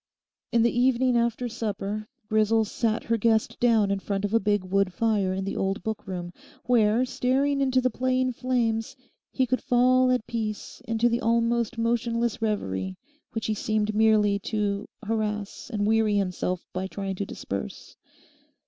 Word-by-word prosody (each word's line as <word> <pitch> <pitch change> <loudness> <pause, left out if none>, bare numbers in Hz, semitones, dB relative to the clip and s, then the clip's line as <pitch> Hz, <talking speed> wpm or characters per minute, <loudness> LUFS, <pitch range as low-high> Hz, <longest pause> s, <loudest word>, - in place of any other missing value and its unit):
In 235 -1 +3
the 235 - +2
evening 250 0 +3
after 235 +1 +1
supper 215 -2 -4 0.2
Grisel 215 +1 +3
sat 225 +1 -1
her 230 0 0
guest 220 0 +1
down 225 -4 +3
in 200 - 0
front 200 0 -2
of 205 - -3
a 230 - +5
big 205 -1 +1
wood 195 0 +1
fire 210 -3 +1
in 190 0 -2
the 195 - -3
old 195 +1 -1
book 220 -2 -4
room, 175 -2 -5 0.3
where, 230 0 +3
staring 275 +3 +1
into 260 -1 +3
the 255 0 +1
playing 255 +1 0
flames, 230 -3 -1 0.4
he 260 - +1
could 255 +1 -1
fall 255 +1 +4
at 250 -3 +1
peace 220 0 -4
into 230 +1 +2
the 235 0 0
almost 235 +1 +1
motionless 230 0 0
reverie 95 - -2 0.4
which 225 -1 -3
he 220 - 0
seemed 215 0 -1
merely 210 -2 +3
to 205 -1 -2 0.2
harass 210 -1 -3
and 205 -3 0
weary 220 -1 +3
himself 185 -2 -1
by 185 +1 -2
trying 195 0 -4
to 200 - -2
disperse. 95 -9 -6
220 Hz, 165 wpm, -26 LUFS, 205-235 Hz, 0.4 s, a